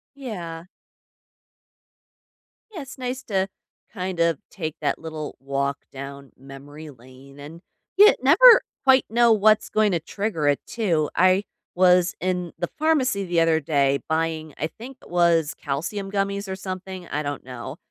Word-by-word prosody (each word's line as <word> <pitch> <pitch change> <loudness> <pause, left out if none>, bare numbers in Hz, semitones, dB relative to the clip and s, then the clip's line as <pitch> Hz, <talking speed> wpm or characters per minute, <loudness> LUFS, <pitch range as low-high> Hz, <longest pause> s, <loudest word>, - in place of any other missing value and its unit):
Yeah. 175 -12 -7 2.1
Yeah, 335 - -6
it's 270 0 -11
nice 255 +1 -4
to 195 -3 -1 0.4
kind 185 -4 -4
of 170 -3 +2
take 160 -6 -5
that 150 - -1
little 155 -2 -7
walk 140 +1 -2
down 140 0 -9
memory 140 +3 -11
lane 130 +2 -16
and 155 +4 -10 0.4
you 415 +2 +8
never 420 - +8 0.2
quite 265 -1 +5
know 235 0 +4
what's 215 0 +3
going 215 -1 +2
to 170 - 0
trigger 170 -2 -3
it 145 -1 +2
too. 170 -10 -1
I 185 +2 +4 0.3
was 180 -1 +4
in 180 -1 -2
the 175 - -2
pharmacy 265 -10 +1
the 175 -2 +1
other 165 -1 +3
day 140 -2 +1
buying, 160 -1 -2
I 155 - -2
think 245 - -12
it - - -16
was 170 -3 +2
calcium 180 +8 -4
gummies 200 0 -2
or 190 - -4
something, 185 -1 -7
I 150 +1 -2
don't 145 -1 -5
know, 125 -2 -8
175 Hz, 150 wpm, -23 LUFS, 150-205 Hz, 2.1 s, you